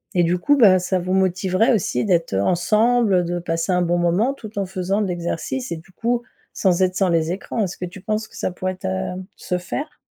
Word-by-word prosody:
et 175 - +4
du 170 +2 +2
coup, 290 +10 +3
bah 200 -7 +7
ça 185 +1 0
vous 180 +1 -2
motiverait 190 +4 +2
aussi 165 - 0
d'être, 170 - +1
heu, 95 - +2
ensemble, 210 - +3
de 175 +1 -2
passer 165 +1 -2
un 180 - +2
bon 175 0 +1
moment 175 +9 +2
tout 220 -6 -11
en 195 - 0
faisant 190 +2 -1
de 205 - 0
l'exercice 180 +9 -3
et 170 - -2
du 165 +4 -15
coup, 235 +5 -1 0.3
sans 185 -2 +2
être 185 0 +2
sur 190 -1 +2
les 165 -1 +1
écrans. 200 +4 -2
Est-ce 185 - -4
que 180 - -4
tu 185 +2 -10
penses 215 +2 -2
que - - -18
ça - - -2
pourrait 185 +1 -3
être, 185 - -11
heu, 95 - -2 0.2
se 180 - -2
faire? 290 - -5
185 Hz, 235 wpm, -21 LUFS, 175-210 Hz, 0.3 s, bah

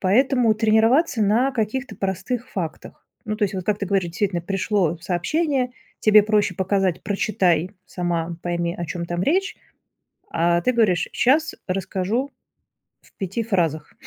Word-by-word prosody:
Поэтому 240 +4 +3
тренироваться 225 +5 +3
на 230 +7 +2
каких-то 250 +3 -2
простых 195 +6 -3
фактах, 170 -6 -6 0.2
ну 215 - -2
то 210 - +1
есть 195 0 -3
вот 185 -2 -4
как 210 -1 0
ты 200 - -3
говоришь, 190 -2 +1
действительно 175 0 -1
пришло 195 -2 0
сообщение 255 - 0 0.3
тебе 215 -1 +6
проще 205 -3 +1
показать: 190 -1 0
"Прочитай 185 -4 +1 0.2
сама, 170 -2 -2
пойми 170 -1 -1
о 175 - -4
чём 170 +2 -4
там 175 +1 -2
речь". 375 - +1 0.8
А 170 +1 +2
ты 250 - +2
говоришь: 195 -7 +2
"Щас 310 +6 +2
расскажу 195 +8 -2 0.7
в - - -25
5 195 +4 -3
фразах". 165 -8 -1
200 Hz, 145 wpm, -22 LUFS, 175-230 Hz, 0.8 s, тебе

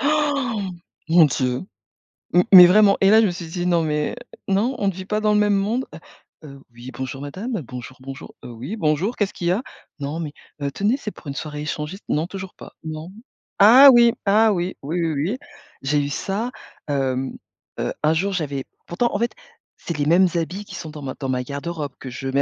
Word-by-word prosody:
Han! 280 -9 0 0.4
Mon 165 0 +7
Dieu, 125 -1 -1 0.7
m 180 - +5
mais 180 -2 +12
vraiment 200 +1 +5
et 195 - +6
là 220 +2 +7
je - - +4
me 180 - -1
suis 175 -1 -7
dit: 175 +2 -4
«Non 170 -2 +3
mais 150 -1 -1 0.3
non, 220 +7 +1
on 200 - 0
ne - - +3
vit 185 +1 -8
pas 210 +1 -1
dans 210 0 +2
le 210 - +3
même 205 -1 +3
monde», 220 +6 0 0.6
heu, 140 -2 -11
«Oui 120 +2 -10
bonjour 130 +2 -6
madame. 195 - -4
Bonjour, 125 0 -9
bonjour.» 135 0 -9
«Heu, 120 - -8
oui 125 - -6
bonjour, 165 +6 0
qu'est-ce 205 -2 -1
qu'il 175 - -4
y 175 - +3
a?» 200 - +1 0.4
«Non 145 +4 -4
mais 150 -3 -4 0.3
heu, 140 0 -1
tenez 205 - +1
c'est 220 -6 -6
pour 150 - -15
une 140 - -5
soirée 150 0 -5
échangiste.» 150 +6 -5
«Non 155 +3 0
toujours 190 -1 -7
pas, - - -12
non». 155 +2 -6 0.5
Ah 250 +7 +10
oui 235 -1 +6
ah 215 +2 +4
oui, 180 0 -2
oui, 165 +5 -2
oui, 160 - -1 0.2
oui, 255 - -3 0.4
j'ai 145 +2 +1
eu 140 - -2
ça. 200 - -2 0.4
Hem 135 -2 -1 0.4
heu, - - -2
un 155 +1 +4
jour 195 +5 0
j'avais 145 -6 -2 0.2
pourtant 235 +8 -1
en 205 - -1
fait, 235 +1 0 0.4
c'est 170 - -5
les 145 - 0
mêmes 175 +4 +5
habits 180 +5 -2
qui - - -10
sont 160 - -7
dans 150 - -9
ma 130 -2 -5
dans 135 - -3
ma 125 -1 -1
garde-robe, 145 +2 -5
que 130 - -7
je 135 +2 -6
mets 140 +1 +2
170 Hz, 215 wpm, -22 LUFS, 145-205 Hz, 0.7 s, mais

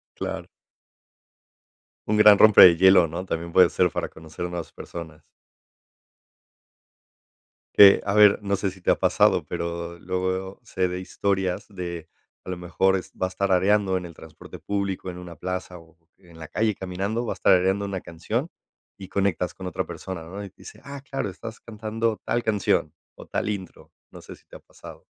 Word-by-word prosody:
Claro. - - -5 1.6
Un 105 - +1
gran 105 -1 +8
rompe 110 -1 +7
de 85 -2 +9
hielo, 95 -1 +6
¿no?, 85 +4 -6
también 85 -1 -4
puede 90 0 +5
ser 90 - +2
para - - -4
conocer 80 +2 -8
nuevas 90 -1 -6
personas. 80 -3 -10 2.5
Que, 100 -1 +9
a 100 - -1
ver, 105 -1 +6
no 100 -1 -1
sé 95 -1 -2
si 95 - -15
te - - -2
ha - - +4
pasado, - - +2
pero 85 0 -5
luego, 95 +2 -3
sé 95 -5 -1
de 90 +1 -5
historias 95 -1 -2
de, 85 -5 -7 0.4
a - - -8
lo 90 - -3
mejor 90 +2 +1
es 95 - -5
vas 95 0 -3
tarareando 95 0 +2
en 90 - -6
el 85 - -10
transporte 80 0 -13
público, 100 -2 -3
en 90 - -8
una 90 -2 -10
plaza 90 +2 -5
o 80 -1 -19 0.2
en 85 -3 -18
la 80 - -8
calle 110 -1 0
caminando, 95 +6 -3
vas - - -5
tarareando 95 +2 +3
una 100 -2 -4
canción 110 - -4 0.5
y 95 -1 -10
conectas 95 -3 -1
con 95 - -8
otra 95 0 -3
persona, 85 0 -7
¿no?, 95 +5 -8
y 100 - -9
dice: - - -13
"Ah, 140 -1 -8
claro, 135 -4 -4
estás 110 +4 -9
cantando 110 0 -3
tal 120 - -1
canción 100 -7 0 0.2
o - - -12
tal - - -2
intro". 95 -3 -7 0.2
No - - -13
sé - - -12
si - - -28
te - - -15
ha - - -10
pasado. - - -14
95 Hz, 175 wpm, -24 LUFS, 90-100 Hz, 2.5 s, de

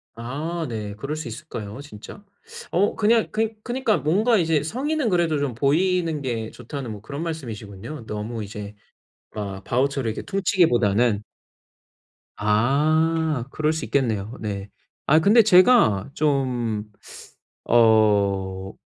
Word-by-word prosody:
아 150 +8 -4
네. 105 -3 -5
그럴 140 +7 -4
수 155 -4 -6
있을까요 115 -3 -7
진짜? 145 - -11 0.5
어 195 +4 +2
그냥 225 +1 +2
그니 220 0 -1
그니까 245 -3 0
뭔가 215 +9 +2
이제 165 -5 +2
"성의는 265 - -1
그래도 170 -5 +1
좀 140 -4 -2
보이는 165 +4 +1
게 115 -4 -3
좋다."는 130 -1 -7
뭐 105 -2 -8
그런 140 +8 -6
말씀이시군요. 120 - -7
너무 110 +1 -5
이제 105 0 -8 0.6
아 100 -2 -5
바우처로 135 0 0
이렇게 110 - -4
퉁치기보다는. 120 - +2 1.1
아 150 +6 +1
그럴 155 0 0
수 160 - -4
있겠네요. 110 -6 -1
네. 100 -2 -4 0.4
아 155 +2 +5
근데 215 +7 +6
제가 185 - +5
좀 125 -7 -1 0.7
어 100 -4 +3
140 Hz, 255 characters per minute, -23 LUFS, 110-165 Hz, 1.1 s, 근데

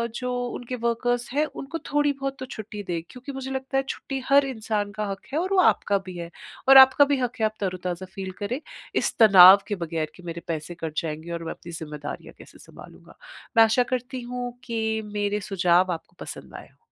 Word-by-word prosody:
जो 250 0 -3 0.2
उनके 245 +1 -5
वर्कर्स 240 +1 -1
हैं 300 +2 +2
उनको 305 +1 -6
थोड़ी-बहुत 275 -2 0
तो 260 - -5
छुट्टी 210 -3 -8
दे 170 -3 -3
क्योंकि 255 +3 -9
मुझे 265 0 -6
लगता 265 0 -2
है 270 - +2
छुट्टी 270 -1 -4
हर 280 0 +6
इंसान 215 -5 -2
का 210 +1 -3
हक 195 - -8
है 310 - +1
और 375 +3 -1
वो 380 - +4
आपका 200 - +3
भी 185 -1 -8
है। 170 -1 -6 0.4
और 270 0 +9
आपका 265 +2 +8
भी 285 0 +1
हक 245 -1 -2
है 220 - +2
आप 215 - 0
तरोताज़ा 185 -2 -3
फ़ील 190 -1 -5
करें, 230 +7 -3 0.4
इस - - +1
तनाव 195 -2 +10
के 205 - -2
बगैर 165 -3 -3
कि 180 - -15
मेरे 170 0 -6
पैसे 165 +1 -4
कट 160 - -3
जाएँगे 160 +1 -5
और 170 - -4
मैं 165 - -3
अपनी 170 - -12
जिम्मेदारियाँ 150 -2 -7
कैसे - - -15
सँभालूँगा। - - -15 0.4
मैं 225 - +9
आशा 225 +3 +3
करती 255 +1 -3
हूँ 245 0 -5
कि 220 -2 -2
मेरे 205 0 -1
सुझाव 185 -2 +2
आपको 170 +2 -10
पसंद - - -8
आए - - -10
हों। - - -31
220 Hz, 210 wpm, -25 LUFS, 180-260 Hz, 0.4 s, तनाव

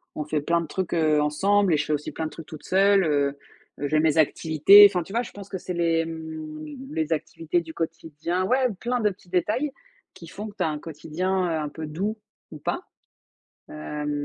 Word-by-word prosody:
on 150 - -3
fait 150 0 -1
plein 170 +3 +1
de 165 - -6
trucs, 185 +1 -3
heu, 155 -3 +3
ensemble 190 +5 +2
et - - +3
je - - -1
fais 155 - -1
aussi 150 0 -3
plein 160 - -4
de - - -7
trucs 165 - -10
toute 155 0 -11
seule, 195 +1 +4
heu, 145 -3 +1 0.4
j'ai 145 +2 +1
mes 160 0 +2
activités. 160 +6 +7
Enfin 180 -3 -1
tu 195 - -13
vois, 235 +2 +1
je - - -10
pense 200 -1 -11
que 190 - -4
c'est 180 0 -5
les, 165 -1 +2
hem, 160 -1 -6 0.3
les 160 - 0
activités 165 +2 -2
du 160 -1 -10
quotidien 165 +2 -3
ouais 255 +3 +2
plein 245 +1 -1
de 210 -2 +3
petits 185 -2 -13
détails 220 - 0 0.4
qui 170 -3 -12
font 210 +6 -7
que 205 - -14
tu 185 - 0
as 160 - +1
un 150 - -3
quotidien, 180 +5 -2
heu, 160 -2 -1
un 150 - -3
peu 155 +1 -7
doux 195 +8 -2 0.4
ou 155 - -9
pas. - - -3 0.9
Hem, 150 - -5
165 Hz, 220 wpm, -25 LUFS, 155-190 Hz, 0.9 s, activités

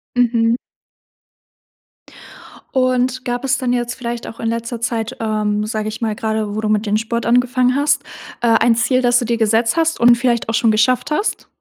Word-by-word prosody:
Mhm. 235 -1 +2 2.2
Und, 255 0 0
gab 245 0 -3
es 260 -1 +1
dann 250 -1 -1
jetzt 240 0 -2
vielleicht 235 -1 -5
auch 225 - -10
in 225 - -3
letzter 230 +1 -4
Zeit, 230 -1 -3
ähm, 210 -1 -1
sage 215 0 -3
ich 215 - -7
mal- 220 -2 -1
gerade 220 -1 -2
wo 215 - -2
du 215 - -1
mit 215 0 +1
dem 210 0 0
Sport 235 +1 -3
angefangen 250 +1 +2
hast- 290 +1 +1 0.4
äh, 240 - +1
ein 230 0 +4
Ziel, 255 +3 +1
das 245 -1 +3
du 245 - -3
dir 235 0 0
gesetzt 225 +1 +2
hast 325 0 +1
und 240 0 +6
vielleicht 235 -1 0
auch - - -1
schon 225 0 +3
geschafft 250 +6 +1
hast? 405 +8 -2
235 Hz, 190 wpm, -18 LUFS, 225-250 Hz, 2.2 s, und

